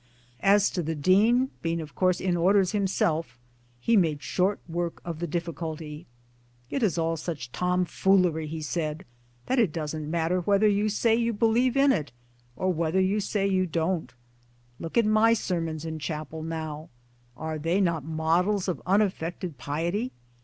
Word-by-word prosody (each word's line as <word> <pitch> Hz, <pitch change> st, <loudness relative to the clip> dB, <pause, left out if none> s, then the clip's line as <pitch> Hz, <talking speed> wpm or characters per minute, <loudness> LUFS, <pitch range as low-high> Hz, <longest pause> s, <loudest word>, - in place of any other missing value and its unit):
As 200 Hz, +1 st, +4 dB
to 180 Hz, -, -2 dB
the 160 Hz, 0 st, -2 dB
Dean, 215 Hz, -, +3 dB
being 165 Hz, 0 st, -1 dB
of 155 Hz, -3 st, -7 dB
course 185 Hz, -1 st, +2 dB
in 185 Hz, -2 st, 0 dB
Orders 185 Hz, +2 st, +3 dB
himself 175 Hz, -, 0 dB, 0.4 s
he 230 Hz, -, +2 dB
made 155 Hz, -8 st, +2 dB
short 190 Hz, +8 st, 0 dB
work 170 Hz, 0 st, -3 dB
of 170 Hz, -2 st, -5 dB
the 175 Hz, -, -2 dB
difficulty: 160 Hz, -1 st, -5 dB, 0.6 s
"It 275 Hz, -, -1 dB
is 200 Hz, -7 st, +1 dB
all 165 Hz, 0 st, 0 dB
such 150 Hz, -7 st, -5 dB
tomfoolery," 180 Hz, -1 st, +1 dB
he 155 Hz, +1 st, -5 dB
said, 155 Hz, 0 st, -3 dB, 0.2 s
" 120 Hz, 0 st, -35 dB
that 260 Hz, -, +1 dB
it 215 Hz, -9 st, +3 dB
doesn't 155 Hz, -1 st, -4 dB
matter 170 Hz, +2 st, +1 dB
whether 200 Hz, +3 st, +3 dB
you 205 Hz, +1 st, +2 dB
say 225 Hz, +2 st, +2 dB
you 230 Hz, 0 st, 0 dB
believe 235 Hz, +4 st, +2 dB
in 275 Hz, 0 st, +5 dB
it, 150 Hz, -, -1 dB, 0.4 s
or 185 Hz, +6 st, 0 dB
whether 165 Hz, +2 st, 0 dB
you 190 Hz, +3 st, +2 dB
say 205 Hz, 0 st, -1 dB
you 185 Hz, -2 st, +1 dB
don't. 165 Hz, -3 st, -1 dB, 0.7 s
Look 165 Hz, +5 st, -5 dB
at 230 Hz, -, +5 dB
my 215 Hz, +2 st, +4 dB
sermons 165 Hz, -6 st, -3 dB
in 160 Hz, -1 st, -4 dB
chapel 155 Hz, +1 st, -5 dB
now 160 Hz, -1 st, -5 dB, 0.5 s
are 155 Hz, +2 st, -4 dB
they 165 Hz, +5 st, +1 dB
not 170 Hz, -6 st, +1 dB
models 165 Hz, +6 st, +1 dB
of 180 Hz, -, -2 dB
unaffected 180 Hz, -, 0 dB
piety 170 Hz, -, -2 dB
175 Hz, 165 wpm, -27 LUFS, 160-200 Hz, 0.7 s, in